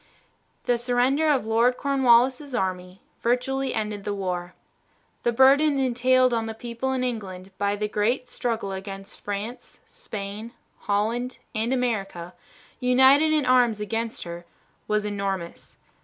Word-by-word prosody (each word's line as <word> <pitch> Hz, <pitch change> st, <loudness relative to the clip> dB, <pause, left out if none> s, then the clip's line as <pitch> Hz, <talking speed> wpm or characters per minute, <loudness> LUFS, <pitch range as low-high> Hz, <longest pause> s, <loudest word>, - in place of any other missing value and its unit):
The 245 Hz, -1 st, +1 dB
surrender 250 Hz, +5 st, +2 dB
of 270 Hz, -7 st, +2 dB
Lord 230 Hz, +3 st, +2 dB
Cornwallis' 265 Hz, 0 st, +3 dB
army 185 Hz, -2 st, -3 dB, 0.2 s
virtually 260 Hz, +2 st, 0 dB
ended 210 Hz, -2 st, -3 dB
the 205 Hz, 0 st, -2 dB
war. 180 Hz, -2 st, -4 dB, 0.7 s
The 240 Hz, -, +1 dB
burden 275 Hz, +4 st, +5 dB
entailed 255 Hz, 0 st, +3 dB
on 225 Hz, -1 st, 0 dB
the 220 Hz, -, -5 dB
people 235 Hz, +3 st, -4 dB
in 255 Hz, -1 st, -1 dB
England 195 Hz, -6 st, -5 dB
by 200 Hz, 0 st, +1 dB
the 210 Hz, +1 st, -2 dB
great 225 Hz, +5 st, 0 dB
struggle 230 Hz, -5 st, -3 dB
against 195 Hz, 0 st, -7 dB
France, 205 Hz, +4 st, -6 dB
Spain, 215 Hz, -, -7 dB, 0.4 s
Holland, 230 Hz, +5 st, 0 dB, 0.2 s
and 225 Hz, +2 st, -1 dB
America, 195 Hz, -9 st, -2 dB, 0.5 s
united 265 Hz, +5 st, +5 dB
in 305 Hz, -3 st, +2 dB
arms 245 Hz, -4 st, +4 dB
against 225 Hz, +2 st, -3 dB
her, 170 Hz, 0 st, -7 dB, 0.4 s
was 210 Hz, 0 st, 0 dB
enormous. 195 Hz, -4 st, -4 dB
235 Hz, 130 wpm, -25 LUFS, 200-255 Hz, 0.7 s, burden